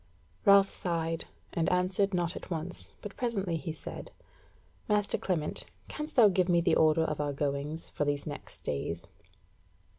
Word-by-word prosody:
Ralph 200 0 +8
sighed, 165 -3 -2 0.3
and 165 - +1
answered 185 +2 +2
not 175 -1 0
at - - -8
once, 170 +1 -3 0.2
but 210 -2 -7
presently 200 -8 -1
he 160 0 -3
said: 155 - -7 0.8
"Master 210 -1 +3
Clement, 165 -5 -1 0.2
canst 305 +1 -5
thou 235 -5 +8
give 185 -2 +2
me 175 -1 +5
the 170 - +2
order 160 +1 +4
of 150 -2 -1
our 145 -1 -1
goings 145 +3 -2
for - - -1
these 145 -1 -1
next 145 -1 -7
days?" 80 +4 -3
170 Hz, 155 wpm, -30 LUFS, 150-195 Hz, 0.8 s, Ralph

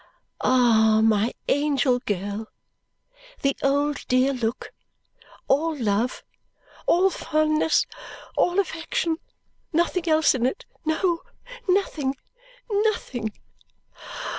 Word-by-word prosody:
Ah, 220 -4 +4
my 220 +1 +3 0.2
angel 280 -3 +2
girl! 205 +2 -3 1.0
The 275 -1 +2
old 285 +1 0
dear 255 +2 +3
look, 240 -1 -3 0.8
all 310 +3 +1
love, 225 +1 0 0.6
all 375 +2 +4
fondness, 310 -1 +1 0.5
all 355 +1 +2
affection. 330 -2 -1 0.5
Nothing 340 +1 0
else 315 0 +4
in 250 -2 +1
it 265 - -4 0.2
no, 335 +2 +1 0.5
nothing, 310 -8 +1 0.6
nothing! 400 - 0
280 Hz, 90 wpm, -24 LUFS, 240-325 Hz, 1.0 s, Ah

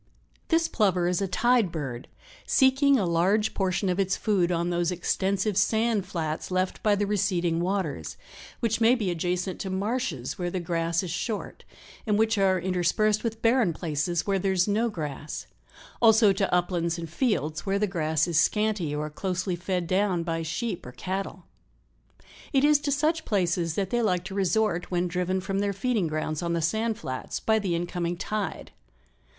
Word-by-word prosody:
This 330 0 +2
Plover 185 -5 +1
is 180 +1 0
a 195 - 0
tide 240 0 +2
bird, 135 -7 -5 0.4
"seeking 270 +1 +4
a 200 - +1
large 190 +6 +2
portion 190 0 0
of 180 +1 0
its 195 -1 +1
food 185 -5 +1
on 170 0 0
those 175 -1 +1
extensive 190 +3 0
sand 220 0 +1
flats 160 -4 -3
left 185 0 -1
by 210 -1 +3
the 205 0 0
receding 185 -5 0
waters, 175 - -2 0.4
which 225 0 0
may 230 +3 +6
be 210 -7 -1
adjacent 180 +2 -2
to 190 - -4
marshes 215 +4 -2
where 175 -1 -1
the 185 - -3
grass 165 0 -1
is 180 - -4
short, 210 +5 -4 0.4
and 210 -1 +2
which 220 -1 +2
are 190 -1 +3
interspersed 190 +4 +1
with 225 -1 -4
barren 230 -6 +3
places 165 +1 -2
where 195 -1 +1
there 190 +1 0
is 185 +1 +2
no 220 +3 +1
grass, 150 -6 -5 0.6
also 220 -3 +6
to 195 0 -1
uplands 175 -1 0
and 170 -1 -5
168 165 - -18 0.2
fields 155 +3 -6
where 195 +1 +2
the 210 - +2
grass 160 -4 0
is 165 -2 +2
scanty 210 -9 +1
or 150 +1 -2
closely 180 +2 -2
fed 180 0 -2
down 185 -1 +1
by 165 -1 -2
sheep 175 +5 -3
or 125 - -9
cattle. 185 +2 -5 1.1
It 270 -2 +3
is 295 0 +5
to 290 0 -2
such 310 +3 +1
places 175 - 0
that 195 -2 -2
they 240 - +1
like 180 -5 +1
to 190 +1 -7
resort 195 -1 0
when 180 0 0
driven 180 +2 -1
from 195 +1 -2
their 200 0 0
feeding 210 -2 0
grounds 155 0 -2
on 170 -1 -1
the 170 - 0
sand 220 +6 0
flats 130 - -5
by 220 0 +2
the 190 -5 -1
incoming 175 0 -2
tide. 210 -1 -4
185 Hz, 180 wpm, -26 LUFS, 170-215 Hz, 1.1 s, may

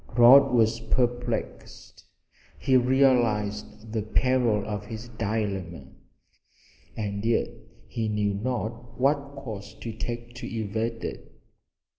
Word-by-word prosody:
Rod 125 +4 +8
was 115 -1 +3
perplexed. 120 0 -3 0.5
He 130 - +2
realized 115 -5 +2
the 110 - 0
peril 120 -1 +1
of 105 -1 -4
his 110 +2 -8
dilemma, 100 -6 -3 1.1
and 100 -1 -3
yet 115 0 +1 0.4
he 110 -2 -2
knew 105 -1 0
not 115 +1 -4
what 140 +1 +1
course 110 -7 -8
to 115 - -7
take 120 +2 -5
to - - -6
evade 115 +1 -3
it. - - -7
115 Hz, 110 wpm, -26 LUFS, 105-120 Hz, 1.1 s, Rod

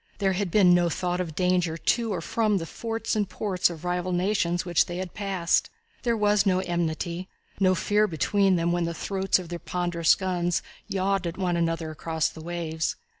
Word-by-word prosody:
There 195 -2 +1
had 190 0 -1
been 180 -1 +5
no 175 -1 +3
thought 180 +1 -1
of 165 -4 -5
danger 180 -2 +1
to 230 +6 +1
or 180 -4 -2
from 215 +4 +1
the 165 - -3
forts 225 +5 -3
and 205 -3 0
ports 185 -5 0
of 170 0 -8
rival 180 +1 -1
nations 175 -1 0
which 175 -2 +2
they 175 - -5
had 185 -1 -5
passed. 195 -4 0 0.3
There 235 -2 +1
was 210 -1 +3
no 190 -3 +2
enmity, 175 0 -2 0.3
and - - -17
no 185 -1 +4
fear 210 +4 +2
between 195 +3 +2
them 170 0 +1
when 175 -1 +1
the 170 0 -3
throats 195 +3 +1
of 180 -3 -7
their 175 -1 -5
ponderous 175 -2 +1
guns 175 -2 -1 0.2
yawned 195 -1 0
at 170 - -5
one 180 -2 0
another 165 -1 -1
across 160 0 -1
the 160 - -11
waves. 160 -1 -2
180 Hz, 200 wpm, -26 LUFS, 170-195 Hz, 0.3 s, been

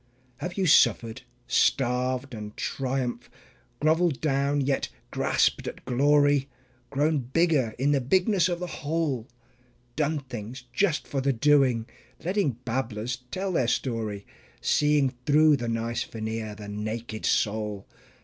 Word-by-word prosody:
Have 175 +7 -5
you 190 - +1
suffered, 120 -6 +4 0.2
starved 125 +1 +1
and 105 -1 -7
triumphed, 125 -3 -2 0.5
groveled 160 -1 +2
down, 140 -1 +1
yet 135 0 0 0.2
grasped - - +1
at - - -7
glory, 145 +2 +3 0.4
Grown 150 +2 +1
bigger 135 -3 +1
in 135 +3 +2
the 140 -2 +2
bigness 185 - +2
of 175 -1 -2
the 180 - -3 0.2
whole? 145 -6 -1 0.7
"Done 155 +1 0
things" 125 -1 -8
just 160 +1 +1
for 135 - -2
the 135 +1 +2
doing, 130 -3 +3 0.4
letting 185 -6 +1
babblers 120 -1 -2
tell 190 +5 -2
the 130 -9 +1
story, 110 -5 -2 0.3
Seeing 150 -3 +2 0.2
through 150 0 +5
the 120 - -4
nice 115 +1 -1
veneer 110 -2 -5
the 105 -1 -9
naked 110 +2 -5
soul? 105 -2 0
130 Hz, 130 wpm, -27 LUFS, 115-150 Hz, 0.7 s, through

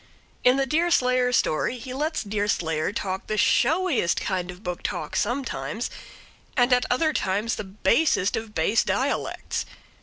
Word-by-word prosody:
In 250 +2 +5
the 275 - +2
Deerslayer 255 -5 +2
story 240 +1 +1
he 250 +2 -7
lets 305 +3 -1
Deerslayer 200 -6 -1
talk 190 -2 -4
the 215 - -2
showiest 305 - +2
kind 185 -2 -2
of 180 +3 -9
book 180 -1 -4
talk 150 - -4
sometimes, 255 +5 -2 0.7
and 245 0 +4
at 250 - +3
other 310 +5 +2
times 210 +1 0
the - - -3
basest 200 - +2
of 220 -1 -5
base 200 +8 +2
dialects. - - -1
230 Hz, 145 wpm, -25 LUFS, 190-260 Hz, 0.7 s, In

